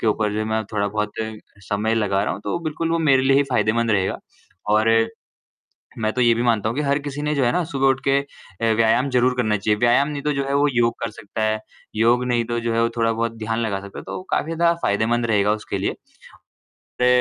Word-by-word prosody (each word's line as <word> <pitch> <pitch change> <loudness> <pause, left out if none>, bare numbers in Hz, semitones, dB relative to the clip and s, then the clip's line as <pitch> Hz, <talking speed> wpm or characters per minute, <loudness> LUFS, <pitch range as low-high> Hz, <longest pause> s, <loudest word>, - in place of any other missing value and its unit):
के - - -2
ऊपर 105 -1 +1
जो 110 0 -1
मैं 110 0 -1
थोड़ा-बहुत 105 0 -1 0.6
समय 110 +2 0
लगा 100 -3 +1
रहा - - -1
हूँ, 100 - -7
तो 170 - -1
बिल्कुल 165 0 -3
वो 165 - +1
मेरे 135 -5 +3
लिए 135 +1 +4
ही 140 - +5
फ़ायदेमंद 115 -1 +1
रहेगा 95 -3 +1 0.6
और 110 +1 +3 1.1
मैं 110 -1 0
तो 125 - 0
ये 120 -1 +5
भी 115 - -1
मानता 110 -2 +1
हूँ 115 - -4
कि - - +1
हर 140 +1 +1
किसी 145 0 -5
ने 150 0 0
जो 140 - +1
है 120 - +3
ना 180 - 0
सुबह 135 -4 0
उठ 135 0 +2
के 135 0 +4
अ, 115 -5 -4
व्यायाम 115 +4 +2
ज़रूर 125 0 +2
करना 110 -4 +1
चाहिए। 105 +1 0
व्यायाम 120 +4 +3
नहीं 145 -2 -4
तो 150 - +1
जो 140 -1 -1
है, 140 - -1
वो 145 +1 +3
योग 120 -1 +2
कर 115 - -1
सकता 105 +1 -7
है, 110 0 +1 0.4
योग 120 +3 +3
नहीं 120 -1 +1
तो 120 0 -2
जो 115 0 -2
है 115 - +2
वो 115 - +2
थोड़ा-बहुत 115 0 0
ध्यान 115 +1 -2
लगा 105 -4 -1
सकता 100 0 -9
है, - - -10
तो - - -6
काफ़ी - - +1
ज़्यादा 170 +1 +3
फ़ायदेमंद 115 +4 +1
रहेगा 105 -2 +2
उसके - - -4
लिए। - - -2 1.1
रे 125 - +4
115 Hz, 235 wpm, -22 LUFS, 110-135 Hz, 1.1 s, ही